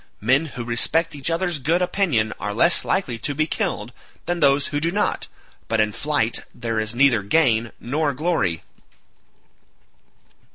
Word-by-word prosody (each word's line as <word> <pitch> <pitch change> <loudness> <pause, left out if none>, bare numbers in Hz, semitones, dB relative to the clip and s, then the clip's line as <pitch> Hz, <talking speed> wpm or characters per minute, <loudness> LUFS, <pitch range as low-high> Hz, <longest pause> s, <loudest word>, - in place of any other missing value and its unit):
Men 130 +9 +2
who 120 - -3
respect 160 +8 +2
each 140 +1 -3
other's 170 -1 -1
good 165 +6 +1
opinion 175 - 0
are 105 0 -4
less 170 +9 +3
likely 130 -12 -1
to 145 +5 -3
be 155 +2 +1
killed - - -3 0.3
than 175 0 -2
those 140 -2 +4
who 145 - +1
do 165 +2 0
not, 205 +4 -1 0.4
but 115 - 0
in 105 -1 +2
flight 145 -5 0 0.2
there 115 -2 -2
is 110 +1 -3
neither 125 -4 +4
gain 115 0 +2
nor 145 +4 -1
glory." 150 - -1
140 Hz, 155 wpm, -22 LUFS, 115-165 Hz, 0.4 s, those